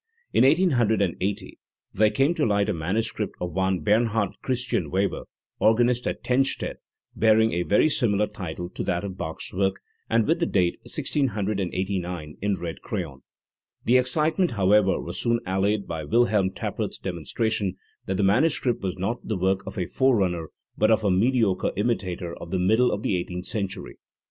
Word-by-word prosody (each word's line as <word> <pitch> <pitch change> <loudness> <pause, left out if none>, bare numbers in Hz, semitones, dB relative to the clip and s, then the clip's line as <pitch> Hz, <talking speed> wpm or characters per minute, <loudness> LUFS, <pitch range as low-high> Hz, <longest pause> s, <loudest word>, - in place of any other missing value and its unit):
In - - +5
1880 110 - +1 0.3
there 110 +1 +4
came 135 +9 +2
to 160 - -1
light 100 -3 +2
a - - +1
manuscript 105 +6 -2
of 90 -1 -3
one 95 -1 0
Bernhard 110 0 +2
Christian 125 - -1
Weber, 95 +4 -1 0.3
organist 120 +2 +3
at - - -3
Tennstedt, 135 +2 0 0.4
bearing 110 0 +4
a 85 - 0
very 100 - +3
similar 105 -8 +2
title 90 -4 -6
to - - -4
that 90 +1 -1
of 95 -2 -5
Bach's 80 -4 -6
work, 95 0 0 0.3
and 115 -1 +3
with 165 +2 +1
the 170 - +1
date 90 -3 +1
"1689" 95 - -2
in 100 -2 0
red 85 -1 -6
crayon. 80 - -5 0.6
The 125 +2 +5
excitement, 155 +5 +1
however, 100 -1 +3
was 85 - -5
soon 115 -1 +1
allayed 100 +2 0
by 80 -2 -5
WilhelrnTappert's 105 -2 0
demonstra 95 +5 -2
tion 100 -4 -1 0.3
that 95 - -1
the 100 - +1
manuscript 125 +4 +2
was 95 -1 -3
not 105 +6 -3
the 110 - -1
work 95 +1 +1
of - - -7
a 90 - 0
forerunner 95 -10 +1 0.3
but 110 - +2
of 110 -1 +3
a 100 - +2
mediocre 110 -1 +2
imitator 95 -6 -2
of 85 - -9
the 95 - -1
middle 110 +7 +3
of 105 - -3
the 95 - +1
eighteenth 90 +1 -5
century. 100 -3 -5
100 Hz, 165 wpm, -25 LUFS, 95-115 Hz, 0.6 s, In